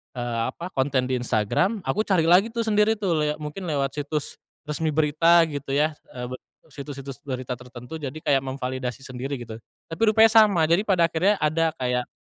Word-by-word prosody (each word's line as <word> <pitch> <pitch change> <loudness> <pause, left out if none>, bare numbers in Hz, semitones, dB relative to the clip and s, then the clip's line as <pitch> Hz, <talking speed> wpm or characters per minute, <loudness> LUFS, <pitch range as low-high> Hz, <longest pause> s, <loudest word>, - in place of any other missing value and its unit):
eee, 120 -1 -3 0.2
apa 175 +2 -7
konten 130 -1 0
di 130 -1 0
Instagram 125 - 0
aku 215 +2 -1
cari 185 -5 +3
lagi 190 +5 +6
tuh 230 -1 -1
sendiri 215 0 +3
tuh 200 -4 -2
lia 150 0 0
mungkin 160 +5 -6
lewat 140 -3 -1
situs, 145 0 -3 0.2
resmi 150 +1 -2
berita 160 +3 +4
gitu 140 -1 -5
ya, 155 +2 +2 0.2
eee, 125 0 -6
be 130 - -5 0.3
situs-situs 140 -1 -8
berita 125 -1 -4
tertentu 125 +5 -9
jadi 140 0 -6
kayak 140 -2 +3
memvalidasi 130 0 -4
sendiri 130 +2 -5
gitu, 110 -1 -9 0.3
tapi 160 - -7
rupanya 220 +1 +6
sama 210 -7 +5
jadi 170 +4 +3
pada 170 -4 +3
akhirnya 190 +6 +2
ada 160 +1 +1
kayak, 125 -2 -1
150 Hz, 180 wpm, -24 LUFS, 130-175 Hz, 0.3 s, lagi